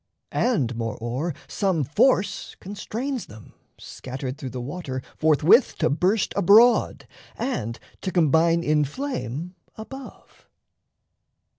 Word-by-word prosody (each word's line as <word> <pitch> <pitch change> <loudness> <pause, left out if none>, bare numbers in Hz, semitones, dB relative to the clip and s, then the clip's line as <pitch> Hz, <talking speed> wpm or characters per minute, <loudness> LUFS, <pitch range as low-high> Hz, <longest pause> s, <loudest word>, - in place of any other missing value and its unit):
And, 140 - +1
moreo'er, 120 +7 -3
Some 190 -7 0
force 190 - +1
constrains 230 +6 -5
them, 110 -1 -14 0.2
scattered 130 0 -6
through 135 - -5
the 125 - -6
water, 130 -1 -5
Forthwith 160 - +4
to - - +1
burst 185 +7 +1
abroad, 225 +6 +5 0.3
and 115 - -3 0.2
to 190 - -3
combine 165 0 +3
In 150 -1 +2
flame 180 - -4 0.2
above. 265 +5 -11
165 Hz, 105 wpm, -24 LUFS, 130-210 Hz, 0.3 s, abroad